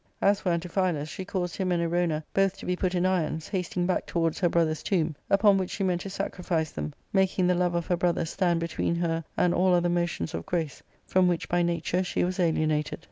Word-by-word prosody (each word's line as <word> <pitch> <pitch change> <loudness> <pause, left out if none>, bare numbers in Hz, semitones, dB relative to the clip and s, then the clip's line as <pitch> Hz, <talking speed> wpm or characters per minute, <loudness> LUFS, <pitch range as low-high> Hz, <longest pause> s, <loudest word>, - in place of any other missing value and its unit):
As 200 0 +3
for 180 - 0
Antiphilus, 170 -2 0
she 190 - -6
caused 180 -2 -3
him 185 -2 0
and 175 - +2
Erona 165 -2 0
both 195 0 +2
to - - -9
be 180 - 0
put 185 0 -1
in 175 +1 +1
irons, 160 -4 0
hasting 180 -2 -1
back 185 - 0
towards 165 -2 0
her 175 - +3
brother's 160 -2 +1
tomb, 165 -5 0
upon 200 0 +5
which 185 - -2
she 195 - -3
meant 180 -2 0
to 195 - -6
sacrifice 175 -4 -2
them, 75 -1 -5 0.2
making 190 -1 +2
the 180 - +4
love 175 -1 +1
of 170 -1 -1
her 175 - 0
brother 175 -1 +1
stand 170 0 +1
between 170 0 -1
her 165 -1 -1
and 175 -1 +3
all 180 0 +3
other 175 0 +2
motions 170 - -1
of 80 0 -5
grace, 160 -6 -2 0.2
from 185 -1 +3
which 175 -2 0
by 175 0 +1
nature 170 +1 0
she 180 - -1
was 180 +1 -2
alienated. 155 -3 +1
175 Hz, 225 wpm, -27 LUFS, 165-185 Hz, 0.2 s, upon